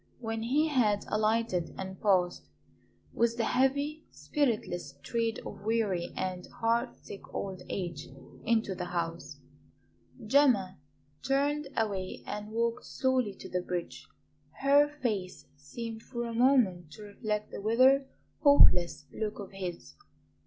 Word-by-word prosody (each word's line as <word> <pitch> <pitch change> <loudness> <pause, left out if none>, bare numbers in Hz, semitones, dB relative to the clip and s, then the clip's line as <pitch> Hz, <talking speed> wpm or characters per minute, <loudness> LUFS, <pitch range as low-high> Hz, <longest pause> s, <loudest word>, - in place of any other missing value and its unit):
When 225 -2 -3
he 285 +7 +2
had 215 -8 +2
alighted 215 -5 0
and 190 0 -6
passed, 185 -4 +2 0.7
with 235 0 +1
the 235 - +1
heavy, 285 +6 +1
spiritless 215 - -2
tread 230 +7 -1
of - - -8
weary 210 -5 0
and 185 -1 -3
heart 235 +2 0
sick 200 - -11
old 190 -2 -4
age, 175 -6 -4 0.4
into 225 -3 +1
the 180 - -4
house, 170 -1 -4 0.9
Gemma 220 - +3 0.4
turned 285 +2 +1
away 195 -4 -2
and 210 0 -5
walked 230 +1 -1
slowly 260 -6 0
to - - -10
the 180 - -1
bridge. 180 -1 -5 0.5
Her 285 +2 +6
face 220 -11 -3
seemed 220 +11 -7
for 240 0 -5
a 230 - -4
moment 225 - +3
to 210 - -10
reflect 210 0 -3
the - - -6
withered, 260 +6 +4 0.3
hopeless 180 - +6
look 215 -1 -3
of 200 -2 -8
his. 185 -3 -6
220 Hz, 130 wpm, -30 LUFS, 185-250 Hz, 0.9 s, Her